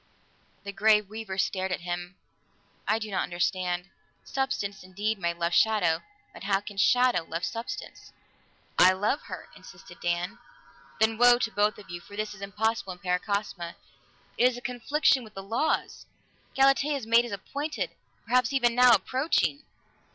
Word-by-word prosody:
The 200 - -5
Grey 210 +2 +5
Weaver 210 -1 -7
stared 190 -1 0
at 185 - -2
him. 175 +1 -5 0.7
"I 215 - +3
do 215 -1 -5
not 190 - 0
understand. 180 0 -1 0.4
Substance, 265 -8 -2
indeed, 205 +3 -2
may 170 -1 0
love 170 0 -2
shadow, 190 -8 +3 0.3
but - - -10
how 195 -1 +2
can 205 0 -10
shadow 245 -1 +4
love 165 +1 -3
substance?" 230 +1 -6 0.7
"I 185 +1 +8
love 205 +9 0
her," - - -8
insisted - - -14
Dan. 175 +1 -2 0.6
"Then 220 0 +2
woe 245 0 +7
to 230 -2 -1
both 210 0 +1
of 200 -4 -12
you! 175 0 -6
For 200 - -13
this 210 0 -3
is 205 - -13
impossible 205 0 -1
in - - -13
Paracosma; 180 -1 -2 0.6
it 250 - +6
is 245 - -6
a - - -8
confliction 265 +2 +2
with 215 -1 -14
the 195 - -6
laws. 230 +10 -1 0.5
Galatea's 275 -1 +3
mate 230 +1 +5
is 240 - -7
appointed, 285 +10 -4 0.3
perhaps 250 +2 +2
even 240 -3 +2
now 250 0 +7
approaching." 280 +1 0
210 Hz, 160 wpm, -28 LUFS, 185-240 Hz, 0.7 s, I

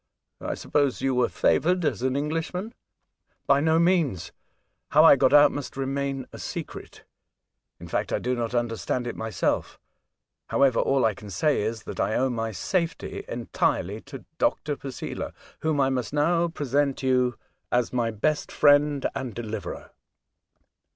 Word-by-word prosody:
I - - -2
suppose 140 -3 0
you 135 -1 +2
were 125 -1 +2
favoured 180 +1 +2
as 125 -8 0
an 130 +1 0
Englishman? 165 - -3 0.3
" - - -54
" - - -46
By 140 0 +4
no 160 +2 +3
means. 170 - +1 0.6
How 155 +2 +6
I 160 - +9
got 130 -1 +3
out 145 0 +7
must 145 -2 -6
remain 135 0 -2
a - - -9
secret; - - -7 0.8
in - - -9
fact, - - -2
I - - +1
do 125 - -1
not 120 -1 -2
understand 120 +1 -1
it 120 - -4
myself. 110 -6 -2 0.7
However, 135 -3 +3
all 135 -1 +2
I 110 - +2
can 105 +1 -11
say 150 - +1
is, 110 +1 -3
that - - -7
I 110 - +1
owe 130 0 +1
my 115 -1 -2
safety 170 - -2
entirely 100 +5 -1
to 135 -2 -9
Dr. 150 -1 0
Posela, 135 -2 -6 0.3
whom 155 -2 0
I 135 -1 +3
must 125 0 -2
now 165 +3 +2
present 145 -3 -1
you 125 -2 +2 0.4
as 125 0 +1
my 120 -2 +1
best 145 +8 -1
friend 145 -1 +4
and 130 -6 -5
deliverer." 110 -3 -6
135 Hz, 160 wpm, -26 LUFS, 120-150 Hz, 0.8 s, I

